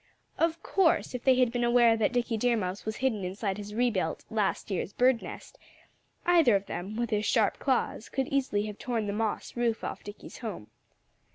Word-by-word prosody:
Of 330 Hz, 0 st, +1 dB
course, 375 Hz, -8 st, +2 dB
if 250 Hz, -, -5 dB
they 260 Hz, -1 st, +5 dB
had 250 Hz, -2 st, +3 dB
been 245 Hz, 0 st, -1 dB
aware 240 Hz, -1 st, +5 dB
that 220 Hz, 0 st, +1 dB
Dickie 245 Hz, -2 st, 0 dB
Deer 235 Hz, +2 st, +2 dB
Mouse 185 Hz, -1 st, -3 dB
was 220 Hz, 0 st, -2 dB
hidden 235 Hz, -6 st, 0 dB
inside 195 Hz, +2 st, -3 dB
his 205 Hz, 0 st, -7 dB
rebuilt, 220 Hz, -9 st, 0 dB
last 210 Hz, -1 st, -1 dB
year's 190 Hz, +1 st, -2 dB
bird's 250 Hz, -1 st, +3 dB
nest, -, -, -10 dB, 0.7 s
either 330 Hz, -11 st, +5 dB
of 200 Hz, 0 st, 0 dB
them, 190 Hz, +4 st, -5 dB
with 235 Hz, 0 st, -2 dB
his 210 Hz, -1 st, +1 dB
sharp 220 Hz, -2 st, +2 dB
claws, 255 Hz, -4 st, -1 dB
could 265 Hz, -1 st, -1 dB
easily 255 Hz, -7 st, 0 dB
have 210 Hz, -1 st, -7 dB
torn 235 Hz, -4 st, -2 dB
the 200 Hz, -, -2 dB
moss 220 Hz, 0 st, -2 dB
roof 235 Hz, -2 st, 0 dB
off -, -, -5 dB
Dickie's 205 Hz, +1 st, -10 dB
home. 205 Hz, -, -6 dB
225 Hz, 195 wpm, -29 LUFS, 205-250 Hz, 0.7 s, they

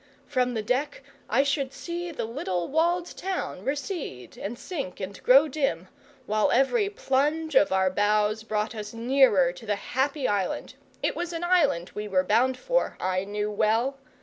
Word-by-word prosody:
From 250 Hz, -1 st, 0 dB
the 220 Hz, -, -1 dB
deck 265 Hz, +5 st, -1 dB, 0.3 s
I 255 Hz, +5 st, +4 dB
should 275 Hz, -1 st, -1 dB
see 345 Hz, +3 st, -5 dB
the 320 Hz, -, -4 dB
little 220 Hz, -, -3 dB
walled 340 Hz, +3 st, 0 dB
town 380 Hz, -1 st, -4 dB
recede 275 Hz, -, -4 dB
and 220 Hz, +4 st, -5 dB
sink 275 Hz, -, -5 dB
and 190 Hz, +1 st, -6 dB
grow 275 Hz, +5 st, +6 dB
dim, 260 Hz, -, -1 dB, 0.4 s
while 215 Hz, 0 st, +2 dB
every 400 Hz, -, +3 dB
plunge 310 Hz, -2 st, 0 dB
of 235 Hz, -7 st, +5 dB
our 190 Hz, -1 st, +2 dB
bows 210 Hz, +2 st, +2 dB
brought 215 Hz, 0 st, -2 dB
us 210 Hz, 0 st, -7 dB
nearer 230 Hz, -7 st, +4 dB
to 180 Hz, +5 st, -12 dB
the 205 Hz, -, +1 dB
happy 265 Hz, +6 st, -1 dB
island 200 Hz, -3 st, -1 dB, 0.3 s
it -, -, +1 dB
was 345 Hz, 0 st, -3 dB
an 335 Hz, +1 st, -4 dB
island 300 Hz, -, +2 dB
we 210 Hz, 0 st, -4 dB
were 185 Hz, -2 st, +2 dB
bound 240 Hz, +7 st, +2 dB
for, -, -, 0 dB
I 185 Hz, +1 st, -1 dB
knew 210 Hz, +1 st, -2 dB
well! 225 Hz, +6 st, +1 dB
250 Hz, 170 wpm, -26 LUFS, 205-295 Hz, 0.4 s, grow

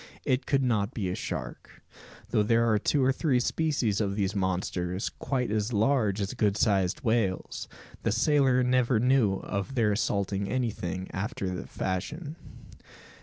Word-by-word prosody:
It 130 Hz, 0 st, 0 dB
could 135 Hz, -1 st, +2 dB
not 110 Hz, -2 st, 0 dB
be 100 Hz, -5 st, -1 dB
a -, -, -2 dB
shark. -, -, -6 dB, 0.5 s
Though 110 Hz, -2 st, +3 dB
there 115 Hz, +2 st, +3 dB
are 105 Hz, -, +3 dB
two 140 Hz, +4 st, +1 dB
or 130 Hz, -, +4 dB
three 135 Hz, -2 st, +1 dB
species 125 Hz, -7 st, 0 dB
of 100 Hz, -2 st, -1 dB
these 100 Hz, -1 st, 0 dB
monsters, 95 Hz, 0 st, -1 dB
quite 125 Hz, -4 st, -2 dB
as 110 Hz, +2 st, -1 dB
large 110 Hz, -2 st, +2 dB
as 100 Hz, -, -2 dB
good 105 Hz, -1 st, +1 dB
sized 95 Hz, -5 st, +1 dB
whales, 110 Hz, -6 st, -1 dB, 0.3 s
the -, -, 0 dB
sailor 130 Hz, +1 st, +3 dB
never 125 Hz, -2 st, +2 dB
knew 125 Hz, -4 st, +3 dB
of 100 Hz, +7 st, -4 dB
their 110 Hz, -4 st, +3 dB
assaulting 100 Hz, -2 st, -1 dB
anything 95 Hz, -7 st, -2 dB
after 100 Hz, -1 st, -3 dB
that 90 Hz, -, -6 dB
fashion. 145 Hz, -, -4 dB
110 Hz, 155 wpm, -28 LUFS, 100-130 Hz, 0.5 s, or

